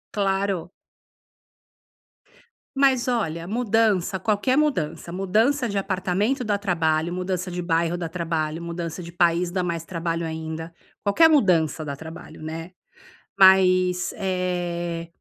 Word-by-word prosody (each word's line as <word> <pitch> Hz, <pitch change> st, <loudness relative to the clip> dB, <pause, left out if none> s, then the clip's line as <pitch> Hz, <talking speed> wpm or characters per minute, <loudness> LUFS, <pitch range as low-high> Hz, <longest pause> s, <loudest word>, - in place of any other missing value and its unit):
Claro. 195 Hz, -3 st, 0 dB, 2.1 s
Mas, 270 Hz, -3 st, +3 dB
olha, 170 Hz, -9 st, -1 dB
mudança, 215 Hz, -4 st, +1 dB
qualquer 215 Hz, +7 st, +1 dB
mudança. 170 Hz, -, 0 dB
Mudança 220 Hz, +9 st, +1 dB
de 200 Hz, -, -2 dB
apartamento 195 Hz, +6 st, 0 dB
dá 210 Hz, -3 st, 0 dB
trabalho, 170 Hz, -4 st, 0 dB
mudança 185 Hz, 0 st, -3 dB
de 180 Hz, 0 st, -4 dB
bairro 170 Hz, 0 st, 0 dB
dá 170 Hz, -2 st, -4 dB
trabalho, 165 Hz, -2 st, -2 dB
mudança 170 Hz, 0 st, -5 dB
de 170 Hz, 0 st, -9 dB
país 175 Hz, 0 st, +2 dB
dá 180 Hz, +1 st, -1 dB
mais 170 Hz, -2 st, -3 dB
trabalho 165 Hz, -1 st, -3 dB
ainda. 160 Hz, +1 st, -5 dB, 0.3 s
Qualquer 320 Hz, +11 st, +5 dB
mudança 170 Hz, -, +2 dB
dá 140 Hz, -1 st, -4 dB
trabalho, 160 Hz, +1 st, -10 dB
né. 165 Hz, +2 st, -6 dB, 0.7 s
Mas, 185 Hz, -1 st, +5 dB
eh, 175 Hz, -3 st, -2 dB
180 Hz, 120 wpm, -24 LUFS, 165-200 Hz, 2.1 s, Qualquer